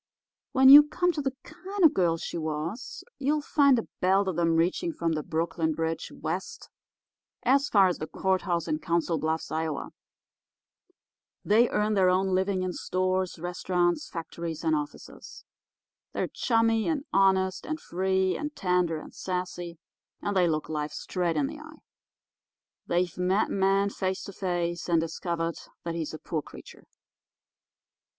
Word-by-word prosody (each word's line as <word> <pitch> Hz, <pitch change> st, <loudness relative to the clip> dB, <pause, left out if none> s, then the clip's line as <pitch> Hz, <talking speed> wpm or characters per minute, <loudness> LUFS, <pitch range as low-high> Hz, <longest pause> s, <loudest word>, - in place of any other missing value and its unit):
When 265 Hz, 0 st, +5 dB
you 285 Hz, +2 st, +13 dB
come 355 Hz, +4 st, +1 dB
to 310 Hz, -, -3 dB
the 270 Hz, -1 st, -2 dB
kind 370 Hz, +5 st, -5 dB
of 320 Hz, -, +8 dB
a -, -, -14 dB
girl 170 Hz, -3 st, +2 dB
she -, -, -6 dB
was, 160 Hz, +9 st, -4 dB, 0.2 s
you'll 290 Hz, +2 st, 0 dB
find 280 Hz, -4 st, +4 dB
a 230 Hz, -, -3 dB
belt 190 Hz, +2 st, +3 dB
of 175 Hz, -3 st, -1 dB
'em 165 Hz, -1 st, +2 dB
reaching 180 Hz, -, +1 dB
from 170 Hz, -, -2 dB
the 155 Hz, -1 st, -1 dB
Brooklyn 160 Hz, +1 st, -1 dB
Bridge 165 Hz, +1 st, -3 dB
west 460 Hz, 0 st, -5 dB, 0.7 s
as 275 Hz, +3 st, +3 dB
far 195 Hz, -3 st, +5 dB
as 180 Hz, -, -2 dB
the 155 Hz, -, -4 dB
courthouse 185 Hz, -2 st, -1 dB
in 155 Hz, -, -1 dB
Council 170 Hz, -1 st, 0 dB
Bluffs, 160 Hz, +2 st, -2 dB
Ia. 155 Hz, -2 st, -2 dB, 1.6 s
They 230 Hz, +4 st, +4 dB
earn 210 Hz, +1 st, +1 dB
their 190 Hz, -3 st, +4 dB
own 190 Hz, +1 st, +1 dB
living 190 Hz, 0 st, +1 dB
in 185 Hz, -1 st, -2 dB
stores, 185 Hz, 0 st, -1 dB
restaurants, 175 Hz, +1 st, -1 dB
factories, 165 Hz, -1 st, -6 dB
and 320 Hz, -1 st, +2 dB
offices. 295 Hz, -1 st, -7 dB, 0.7 s
They're -, -, -1 dB
chummy 225 Hz, -2 st, +1 dB
and 305 Hz, -3 st, -1 dB
honest 190 Hz, -1 st, +2 dB
and 310 Hz, 0 st, -3 dB
free 190 Hz, -, 0 dB
and 295 Hz, 0 st, -5 dB
tender 180 Hz, -4 st, +1 dB
and -, -, -12 dB
sassy, 180 Hz, -2 st, -4 dB, 0.4 s
and 205 Hz, -, -3 dB
they 180 Hz, -2 st, +4 dB
look 155 Hz, -2 st, -1 dB
life 150 Hz, -1 st, -3 dB
straight 175 Hz, -3 st, -2 dB
in 145 Hz, -, +2 dB
the -, -, -6 dB
eye. -, -, -12 dB, 1.1 s
They've 175 Hz, 0 st, 0 dB
met 185 Hz, +4 st, +1 dB
man 195 Hz, +1 st, +2 dB
face 190 Hz, -1 st, -2 dB
to 200 Hz, -, -8 dB
face, 175 Hz, -2 st, -2 dB
and 170 Hz, -1 st, +4 dB
discovered 165 Hz, 0 st, -3 dB, 0.2 s
that 170 Hz, -, -3 dB
he's 165 Hz, -2 st, -3 dB
a 155 Hz, -, -6 dB
poor 155 Hz, 0 st, -3 dB
creature. -, -, -14 dB
185 Hz, 160 wpm, -27 LUFS, 165-210 Hz, 1.6 s, you